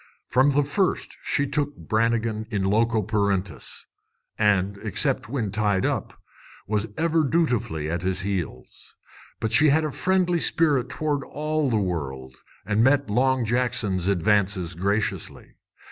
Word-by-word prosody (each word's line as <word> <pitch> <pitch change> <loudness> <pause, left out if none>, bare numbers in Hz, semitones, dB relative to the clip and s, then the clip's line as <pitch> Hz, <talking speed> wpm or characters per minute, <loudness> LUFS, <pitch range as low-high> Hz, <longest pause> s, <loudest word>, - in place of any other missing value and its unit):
From 130 +3 +3
the 145 +1 +3
first 180 +7 -1
she 140 - +1
took 145 0 -2
Brannigan 110 -1 0
in 100 -5 -1
loco 110 +3 +2
parentis, 100 - -2 0.5
and, 100 -2 +1
except 130 +3 -1
when 115 -6 -2
tied 105 -2 +1
up, - - -3 0.5
was 105 +1 -1
ever 165 -1 +2
dutifully 125 - 0
at 85 +2 -2
his 95 +1 -1
heels. 90 -9 -5 0.4
But 110 - -2
she 155 -1 +6
had 155 +2 +3
a 155 - -2
friendly 180 +1 +1
spirit 145 -7 +1
toward 150 -3 -2
all 155 -1 -2
the 115 - +1
world, 70 -9 -3 0.3
and 105 +2 +2
met 135 -2 +3
Long 130 +2 +2
Jackson's 110 -6 0
advances 100 -2 +1
graciously. 100 +5 -2
110 Hz, 135 wpm, -24 LUFS, 100-140 Hz, 0.5 s, she